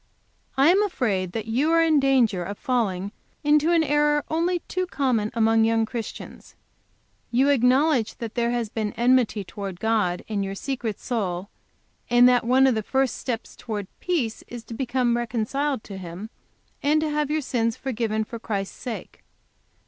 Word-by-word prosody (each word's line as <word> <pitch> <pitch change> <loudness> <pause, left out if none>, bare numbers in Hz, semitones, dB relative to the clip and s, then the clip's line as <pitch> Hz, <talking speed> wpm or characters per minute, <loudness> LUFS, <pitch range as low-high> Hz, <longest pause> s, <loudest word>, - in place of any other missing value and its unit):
"I 275 +4 +6
am 390 +3 +4
afraid 215 - -1
that 220 -2 -3
you 260 +8 +1
are 330 0 +5
in 315 -2 +4
danger 245 -9 +2
of 200 +3 -6
falling 205 -6 -1 0.3
into 300 +2 +4
an 335 -2 +4
error 295 0 +2
only 340 +2 +1
too 370 0 -3
common 250 -10 0
among 225 0 +4
young 225 0 +2
Christians. 230 -1 -8 0.7
You 260 +4 +3
acknowledge 260 -1 +3
that 230 -3 -6
there 235 -1 0
has 240 -2 -1
been 210 -1 -3
enmity 240 -3 +2
to - - -16
towards 195 -3 -5
God 210 -4 0
in 210 -2 -2
your 195 0 -3
secret 240 -3 -4
soul, 195 -5 -3 0.6
and 245 +1 +6
that 250 -1 +4
one 260 +3 +5
of 265 - +4
the 220 - -1
first 265 +2 0
steps 240 -3 -5
towards 210 -4 -5
peace 285 -12 -1
is 240 -1 -8
to 230 - -9
become 245 0 0
reconciled 240 +3 -1
to 195 - -8
Him 185 +4 -8 0.5
and 300 +2 +3
to 310 - 0
have 295 -1 0
your 310 +1 0
sins 230 -4 -1
forgiven 225 -4 -1
for 230 +2 -8
Christ's 200 -3 -4
sake. 240 -3 -7
240 Hz, 170 wpm, -24 LUFS, 215-275 Hz, 0.7 s, I